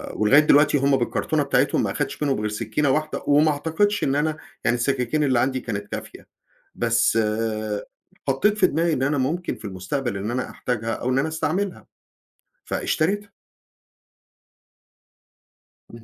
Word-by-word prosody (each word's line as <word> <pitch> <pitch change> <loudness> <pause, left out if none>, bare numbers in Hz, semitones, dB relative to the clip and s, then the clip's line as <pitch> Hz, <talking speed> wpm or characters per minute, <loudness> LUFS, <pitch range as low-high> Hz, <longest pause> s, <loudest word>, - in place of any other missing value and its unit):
ولغاية 110 +8 +5
دلوقتي 145 -1 +5
هُم 140 0 +3
بالكرتونة 120 - 0
بتاعتهم - - +2
ما - - -1
أخدتش - - -3
منهم 135 -6 +1
غير 105 0 -1
سكينة 115 +7 -1
واحدة، 155 +2 -1
وما 150 +2 +5
أعتقدش 160 +8 0
إن 135 0 +1
أنا 155 +1 0 0.3
يعني 120 - +3
السكاكين 135 +3 0
اللي 130 -4 +2
عندي 130 +1 +1
كانت 100 -3 -5
كافية، - - -8 0.5
بس 115 -1 +2 1.1
حطيت 205 +11 +2
في 190 -3 +5
دماغي 165 +1 +1
إن 130 - -1
أنا 145 +2 +1
ممكن 155 +7 -1
في - - -12
المستقبل 100 +5 -3
إن 105 +4 -3
أنا 125 +1 -2
أحتاجها، 115 -2 -3
أو 125 - -3
إن 130 - +2
أنا 145 - 0
أستعملها، 180 +5 -2 0.8
فاشتريتها. 200 +5 -1 2.6
امم. 115 - -12
140 Hz, 145 wpm, -23 LUFS, 120-155 Hz, 2.6 s, ولغاية